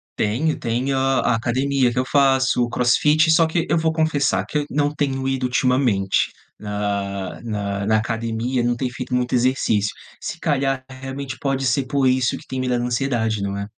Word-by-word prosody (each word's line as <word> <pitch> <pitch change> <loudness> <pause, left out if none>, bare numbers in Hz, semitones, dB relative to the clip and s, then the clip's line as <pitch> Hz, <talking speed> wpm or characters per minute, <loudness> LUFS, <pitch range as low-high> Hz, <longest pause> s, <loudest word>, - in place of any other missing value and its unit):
Tenho, 130 +10 0
tenho 125 +4 -1
a 135 -2 +2
academia 130 +2 +1
que 120 - -7
eu 125 - +1
faço, 135 -2 +3
o 120 - -2
crossfit 150 +7 +3
só 160 0 +5
que, 165 +1 0
eu - - +2
vou 160 0 +1
confessar 145 - +1
que 150 +7 -1
eu 145 - -2
não 145 +1 0
tenho 135 -2 -1
ido 135 -1 -1
ultimamente 125 -6 +1 0.3
na 100 -2 -3
na 100 -3 -3
na 110 0 +4
academia, 115 +3 -1
não 120 0 +1
tenho 125 0 -3
feito 130 0 -6
muito 125 0 -1
exercício, 120 -4 +1 0.3
se - - -5
calhar, 135 -2 0
realmente 130 0 -7
pode 135 -1 -1
ser 130 +1 +1
por 135 0 +1
isso 130 -1 +2
que - - -14
tem 130 - -4
me 130 0 -1
dado 120 -1 0
ansiedade, 120 -3 0
não 100 0 -2
é? 100 - -3
130 Hz, 185 wpm, -21 LUFS, 115-135 Hz, 0.3 s, só